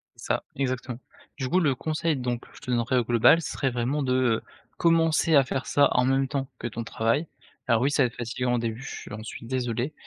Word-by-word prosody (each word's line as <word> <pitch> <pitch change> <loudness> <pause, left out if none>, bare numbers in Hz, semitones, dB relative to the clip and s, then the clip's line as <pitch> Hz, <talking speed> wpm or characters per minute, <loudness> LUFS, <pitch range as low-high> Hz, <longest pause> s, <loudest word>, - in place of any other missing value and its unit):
Ça, - - -2
exactement. 130 -2 -3 0.4
Du 130 -2 -3
coup, 185 - +3
le 145 -7 +2
conseil 155 +2 -1
donc 125 -2 -3
je - - -14
te 125 - -5
donnerai 120 +1 +1
au 125 - +3
global 120 +8 +5
serait 135 -4 -2
vraiment 125 +5 -1
de 130 -1 +1
heu, 125 -3 +2 0.3
commencer 165 -1 +3
à 140 - +7
faire 135 +1 -3
ça 145 - +4
en 125 - +3
même 135 +1 +2
temps 135 -1 -2
que - - -3
ton 115 0 -5
travail, 115 +7 0 0.4
alors 115 -2 +3
oui, 135 - +3
ça 145 - +3
va - - +3
être 115 - -12
fatiguant 125 +1 -1
au - - +1
début, 115 +1 -3
je - - -8
j'en 110 0 -7
suis 115 - -8
désolé, 125 +2 -2
130 Hz, 225 wpm, -26 LUFS, 120-140 Hz, 0.4 s, à